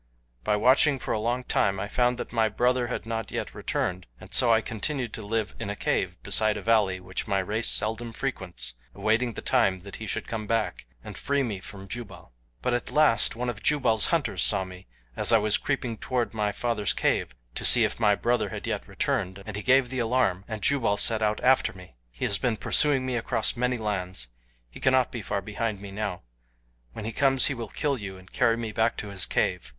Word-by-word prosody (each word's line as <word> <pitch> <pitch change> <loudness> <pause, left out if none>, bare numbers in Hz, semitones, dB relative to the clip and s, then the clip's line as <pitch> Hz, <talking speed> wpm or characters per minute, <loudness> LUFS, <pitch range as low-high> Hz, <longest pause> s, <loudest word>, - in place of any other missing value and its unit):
By 105 - +2
watching 130 +6 +4
for - - -3
a - - 0
long 120 +3 -1
time 100 -5 +1
I 100 - -3
found 125 +3 +1
that - - -6
my 110 -2 +2
brother 125 +1 +1
had 120 - -4
not 115 0 -3
yet - - -4
returned, 90 0 -2
and - - -13
so 120 -2 +5
I 110 - +5
continued 115 +2 -3
to - - -6
live 110 0 -2
in - - -4
a 105 - -3
cave - - -1
beside 110 -1 +3
a - - -5
valley 105 -5 +2
which 90 +1 -5
my 100 - +1
race 105 +4 0
seldom 115 +2 +1
frequents, 110 - -3 0.2
awaiting 110 +4 +1
the - - -7
time 95 -1 +2
that 100 +1 -9
he 110 - -7
should - - -3
come 110 -2 -4
back 110 - -1 0.2
and - - -8
free 140 0 0
me 105 -6 -3
from 95 0 -9
Jubal. 95 - -9 0.3
"But 125 - +1
at 120 - -2
last 150 -10 +3
one 125 +2 -3
of 120 -4 -4
Jubal's 120 -8 +3
hunters - - 0
saw 95 - +3
me 90 0 -11 0.3
as - - 0
I 115 - +7
was 105 -1 +2
creeping 125 -6 -2
toward 125 -3 -1
my 105 -2 0
father's 105 -1 -1
cave - - 0 0.2
to - - -4
see - - +6
if - - -1
my 105 -3 +4
brother 120 +4 0
had - - -6
yet - - -3
returned 95 +1 -2
and 105 - -6
he 105 - -3
gave 130 0 +4
the 130 - -2
alarm 115 -6 +1
and 110 -3 -6
Jubal 115 -7 +2
set 110 +1 +4
out 105 0 +1
after 130 +1 +4
me. 90 -6 -14 0.2
He - - -4
has 100 - +1
been 120 -3 0
pursuing 135 +1 +2
me 130 -2 -1
across 115 0 0
many 125 +1 0
lands. 95 - -3 0.4
He - - -13
cannot 130 -1 +3
be 120 - -5
far 100 -1 -3
behind 105 -1 -3
me 100 0 -9
now. 100 -5 -4 0.7
When 105 - -7
he 115 - -3
comes 135 +2 +4
he 140 - +2
will 115 -4 -6
kill 140 -4 -1
you 95 -2 -7
and 95 0 -17
carry 115 -2 +3
me 115 -2 -4
back 110 +2 +1
to 105 - -5
his 95 -3 +2
cave. - - 0
110 Hz, 220 wpm, -27 LUFS, 100-120 Hz, 0.7 s, I